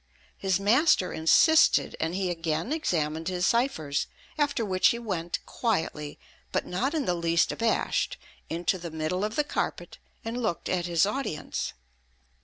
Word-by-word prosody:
His 190 -1 0
master 215 - +3
insisted, 235 - +4
and 165 +2 -1
he 190 -2 0
again 165 - -2
examined 160 - -1
his 180 -1 0
ciphers; 175 - +1 0.3
after 285 -6 0
which 185 -2 +3
he 235 - +2
went 180 -7 -3
quietly, 160 -9 -2 0.3
but - - 0
not 255 - -1
in 300 -4 0
the 180 - +1
least 170 -1 +2
abashed, 230 0 0 0.3
into 175 +3 -1
the 170 0 -6
middle 160 +4 -2
of 215 +1 -2
the 300 - +2
carpet, 295 - -3 0.3
and 235 +2 -3
looked 215 -7 -2
at 180 -1 0
his 170 +1 +3
audience. 205 - -3
180 Hz, 150 wpm, -27 LUFS, 165-230 Hz, 0.3 s, insisted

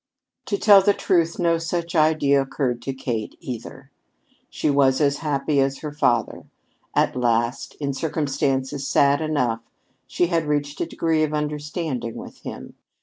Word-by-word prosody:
To 200 - 0
tell 200 -1 +7
the 200 +1 +3
truth, 170 -2 +1
no 170 -2 +2
such 170 +1 -3
idea 155 -3 +3
occurred 130 -3 -2
to 135 - -3
Kate 115 -5 -4
either. 120 -3 -8 0.6
She - - -2
was 140 -2 +3
as 140 -2 +2
happy 145 -1 0
as 135 0 0
her 150 - -5
father. 120 -6 0 0.5
At - - +2
last, 120 0 0
in 140 -2 -3
circumstances 140 -2 -1
sad 140 +1 +3
enough, 125 -8 0 0.5
she 175 - +1
had 165 -2 0
reached 145 0 -1
a - - -1
degree 160 -1 0
of 155 -1 0
understanding 150 -4 -3
with - - -10
him. - - -8
145 Hz, 150 wpm, -23 LUFS, 135-160 Hz, 0.6 s, tell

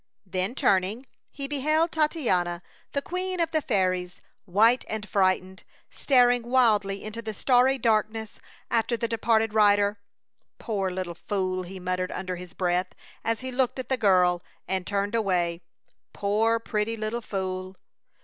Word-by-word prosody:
Then, 185 +5 -2
turning, 200 +4 +1 0.2
he 275 -1 -6
beheld 305 +4 +1
Titania, 190 - 0 0.3
the 280 - -1
queen 365 0 -3
of 330 -1 +1
the 315 -2 +1
fairies, 185 -5 0 0.3
white 220 +7 +4
and 215 -1 -4
frightened, 185 -1 0 0.3
staring 245 -3 +4
wildly 220 -5 +2
into 215 +2 -6
the 220 -2 -6
starry 255 +4 +3
darkness 220 -2 0 0.3
after 235 +1 +1
the 230 - -1
departed 225 -1 +1
rider. 205 -1 +4 0.6
"Poor 200 -4 -2
little 180 -1 -4
fool!" 185 +1 -2
he 185 +1 -8
muttered 185 0 -2
under 185 -1 -4
his 180 0 -10
breath 180 0 0 0.3
as 230 +1 -1
he 260 0 -5
looked 255 0 0
at 260 - -5
the 265 - +2
girl 180 -6 +3 0.3
and 185 -1 -2
turned 200 +1 -1
away. 180 -6 0 0.5
"Poor, 215 +3 +1
pretty 225 0 -2
little 215 +2 -3
fool!" 185 -2 -4
210 Hz, 145 wpm, -26 LUFS, 185-240 Hz, 0.6 s, white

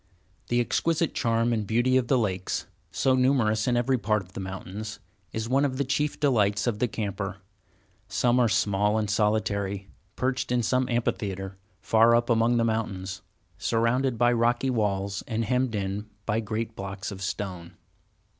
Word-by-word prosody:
The 120 - +1
exquisite 165 +6 +1
charm 115 0 +1
and 110 -3 -1
beauty 120 +4 +2
of 130 -2 +2
the 135 - +3
lakes, 95 -5 -1 0.2
so 135 -1 +2
numerous 125 -4 +2
in 120 -1 +2
every 125 +1 +1
part 105 -1 +1
of 90 0 -20
the - - -6
mountains, 95 +2 -6 0.3
is 110 0 -3
one 135 +3 +2
of 130 -2 0
the 140 - +1
chief 145 +2 -1
delights 105 -8 +2
of 115 -4 -1
the 125 - +2
camper. 100 -3 -4 0.7
Some 120 +5 +2
are 120 -2 +4
small 105 +1 +2
and 110 -1 0
solitary, 100 -2 0 0.3
perched 130 -1 -1
in 125 -1 +2
some 130 +3 +1
amphitheatre 95 -5 -2 0.3
far 115 +3 +5
up 120 +1 +2
among 115 +1 +3
the 115 - +2
mountains, 95 -4 -2 0.4
surrounded 115 +2 +1
by 120 +1 +4
rocky 120 +2 +2
walls, 100 -3 -1
and 115 -1 -1
hemmed 125 0 0
in 100 +1 -3 0.2
by 110 0 +1
great 110 +1 -3
blocks 95 0 -5
of 95 -1 -8
stone. 95 -2 -4
110 Hz, 165 wpm, -27 LUFS, 100-120 Hz, 0.7 s, far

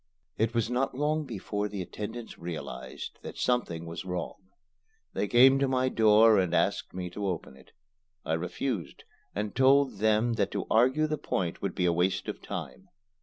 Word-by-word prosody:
It 110 +1 0
was 115 -1 +2
not 125 +2 -1
long 150 +2 0
before 105 -3 -3
the 100 -2 -4
attendants 110 +6 -7
realized 65 -7 -7
that - - -8
something 85 -10 0
was 85 0 -6
wrong. 90 +1 -5 0.6
They 105 - -1
came 130 +4 +6
to 140 - +2
my 130 0 +1
door 110 -2 +6
and 90 -2 +1
asked 100 -2 0
me 90 -1 -4
to 100 +2 -3
open 85 -7 -4
it. 65 - -19 0.5
I 80 - -1
refused, 90 - -3 0.3
and 105 0 -2
told 135 +1 +4
them 110 +2 +2
that 115 - 0
to - - -2
argue 130 +7 +4
the 155 -1 -2
point 90 -3 -2
would - - -3
be 90 - +1
a 85 - +3
waste 90 +2 0
of - - -5
time. 190 - -7
105 Hz, 175 wpm, -29 LUFS, 90-125 Hz, 0.6 s, came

